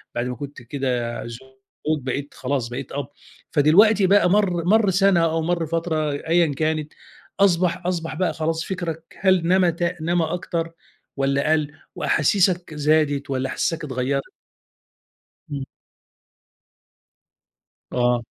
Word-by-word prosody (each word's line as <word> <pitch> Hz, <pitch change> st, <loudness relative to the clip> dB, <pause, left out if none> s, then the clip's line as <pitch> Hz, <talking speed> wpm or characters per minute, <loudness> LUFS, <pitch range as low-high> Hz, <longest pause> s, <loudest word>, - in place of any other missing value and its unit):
بعد 120 Hz, -, -1 dB
ما 125 Hz, -, -4 dB
كنت 140 Hz, -1 st, -8 dB
كده 125 Hz, -2 st, -2 dB
زوج، 130 Hz, +4 st, -6 dB
بقيت 135 Hz, +2 st, -4 dB
خلاص، 130 Hz, -2 st, -2 dB
بقيت 125 Hz, +2 st, -6 dB
أب، 140 Hz, -2 st, -4 dB, 0.4 s
فدلوقتي 190 Hz, +7 st, +5 dB
بقى 195 Hz, -1 st, +5 dB
مَر 180 Hz, -4 st, +2 dB
مَر 210 Hz, +2 st, +4 dB
سَنة 190 Hz, -1 st, +4 dB
أو 165 Hz, 0 st, 0 dB
مَر 170 Hz, 0 st, 0 dB
فترة 160 Hz, -1 st, -1 dB
أيًا 160 Hz, +2 st, +1 dB
كانت 155 Hz, 0 st, -1 dB, 0.5 s
أصبح 180 Hz, -2 st, +2 dB
أصبح 165 Hz, -3 st, -2 dB
بقى 180 Hz, +2 st, 0 dB
خلاص 160 Hz, +1 st, -2 dB
فكّرك 170 Hz, -4 st, -4 dB, 0.2 s
هل 185 Hz, -3 st, +3 dB
نمى 185 Hz, -1 st, +4 dB
ت 170 Hz, +1 st, -5 dB, 0.2 s
نمى 170 Hz, +1 st, +1 dB
أكتر 165 Hz, 0 st, -3 dB, 0.5 s
والّا 140 Hz, +2 st, +1 dB
قَل 155 Hz, -2 st, +1 dB, 0.2 s
وأحاسيسك 180 Hz, +1 st, +1 dB
زادت 145 Hz, -1 st, +1 dB
والّا 130 Hz, -1 st, -1 dB
أحاسيسك 165 Hz, -1 st, -2 dB
اتغيّرت؟ 135 Hz, 0 st, -2 dB, 1.3 s
إمم. 140 Hz, -2 st, -3 dB, 2.3 s
آه. 120 Hz, -1 st, +1 dB
160 Hz, 125 wpm, -22 LUFS, 140-175 Hz, 2.3 s, فدلوقتي